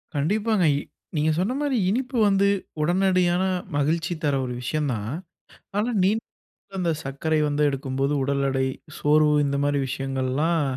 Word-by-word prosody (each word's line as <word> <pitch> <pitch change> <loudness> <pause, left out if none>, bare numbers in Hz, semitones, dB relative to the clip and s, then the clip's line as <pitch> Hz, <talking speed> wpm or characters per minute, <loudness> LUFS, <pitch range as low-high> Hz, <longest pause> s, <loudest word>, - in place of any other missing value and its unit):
கண்டிப்பாங்க. 205 +7 +1
இ - - 0 0.4
நீங்க 155 +1 +2
சொன்ன 200 +8 0
மாரி, 285 -3 0
இனிப்பு 255 +3 -1
வந்து 200 0 +3 0.3
உடனடியான 180 +1 +2 0.3
மகிழ்ச்சி 160 +4 0
தர 145 -2 +2
ஒரு 125 - -4
விஷயம் 145 +3 -1
தான். 105 0 -4 0.7
ஆனா, 215 +4 +1
நீ 190 - +4 0.7
அந்த 175 -2 +1
சர்க்கரை 145 +4 -1
வந்து 145 0 0
எடுக்கும்போது 135 0 -1
உடல் 140 0 0
எடை, 135 0 0 0.3
சோர்வு, 150 0 +4
இந்த 140 0 0
மாதிரி 145 0 +1
விஷயங்கள்லாம், 135 +5 0
150 Hz, 140 wpm, -24 LUFS, 140-185 Hz, 0.7 s, நீ